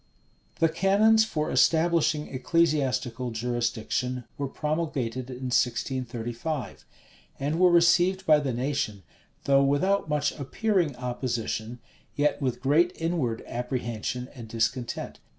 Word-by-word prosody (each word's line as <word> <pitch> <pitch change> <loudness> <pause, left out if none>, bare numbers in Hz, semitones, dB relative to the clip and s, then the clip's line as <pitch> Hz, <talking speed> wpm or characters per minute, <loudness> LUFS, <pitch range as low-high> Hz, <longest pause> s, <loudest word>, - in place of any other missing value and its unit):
The 165 - +4
canons 200 +6 +4
for 155 -8 -2
establishing 165 -2 +2
ecclesiastical 130 -3 0
jurisdiction 120 +2 -2
were 140 - -3
promulgated 135 -5 -3
in 125 0 -5
1635; 125 +1 -2 0.5
and 150 +4 -1
were 180 0 +6
received 175 +2 +4
by 155 -3 +6
the 140 -3 -2
nation, 120 -5 -2 0.4
though 140 0 +4
without 160 +7 +1
much 150 -1 +1
appearing 175 - 0
opposition, 120 -2 -3 0.4
yet 150 0 +1
with 125 -2 -2
great 160 +7 +3
inward 160 -9 -1
apprehension 125 0 -3
and 120 -5 -9
discontent. 115 +2 -2
135 Hz, 110 wpm, -27 LUFS, 125-165 Hz, 0.5 s, were